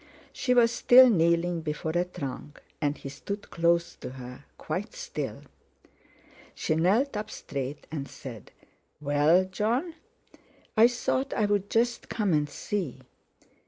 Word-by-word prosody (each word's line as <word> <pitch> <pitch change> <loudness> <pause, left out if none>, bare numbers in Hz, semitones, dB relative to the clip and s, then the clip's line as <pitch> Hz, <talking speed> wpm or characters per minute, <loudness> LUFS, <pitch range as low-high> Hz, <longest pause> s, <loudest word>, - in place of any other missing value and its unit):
She 250 -2 +1
was 230 -1 +5
still 245 +1 +7
kneeling 170 -1 +2
before 155 0 -3
a 175 +2 +1
trunk, 145 -3 -7 0.2
and 145 -1 0
he - - -8
stood 200 +9 -7
close 170 0 +2
to - - -7
her, 125 -1 -10
quite - - -4
still. - - -5 1.1
She - - 0
knelt 210 - +2
up 210 0 -3
straight, 140 0 -5
and 140 -3 -4
said: 120 -7 -10 0.5
"Well, 150 +5 +3
Jon?" 230 - -1 0.8
"I 225 +1 +7
thought 255 +2 -1
I'd 205 -2 +1
just 235 +1 0
come 205 -6 0
and 150 -1 +1
see." 145 -4 -4
175 Hz, 130 wpm, -28 LUFS, 150-220 Hz, 1.1 s, still